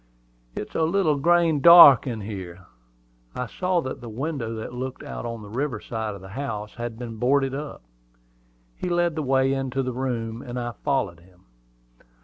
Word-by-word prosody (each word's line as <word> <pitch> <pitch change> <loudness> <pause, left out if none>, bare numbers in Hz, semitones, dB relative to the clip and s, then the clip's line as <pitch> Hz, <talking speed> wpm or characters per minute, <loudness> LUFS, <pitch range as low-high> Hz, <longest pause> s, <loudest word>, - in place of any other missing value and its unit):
"It's - - -6
a - - -1
little 160 -1 +2
grain 165 0 +3
dark 170 -5 +9
in 115 -4 -4
here." 95 -3 -8 0.7
I 125 - -2
saw 180 +7 -1
that 130 -4 -6
the 120 - -8
window 125 -1 -4
that 110 +2 -6
looked 130 +1 -6
out - - -6
on 115 -2 -6
the - - -10
river 130 -1 -2
side 110 -1 -4
of 100 - -11
the 95 - -11
house 105 -3 -5
had 120 -1 -6
been 115 -2 -7
boarded 135 +3 +1
up. 145 - -6 0.9
He 180 - -4
led 175 -1 +1
the 155 - -3
way 135 -1 +2
into 135 0 -2
the 125 -1 -3
room, 120 -3 -3
and 125 -1 -6
I 120 0 -3
followed 115 - -2
him. 90 +1 -23
125 Hz, 180 wpm, -24 LUFS, 110-145 Hz, 0.9 s, dark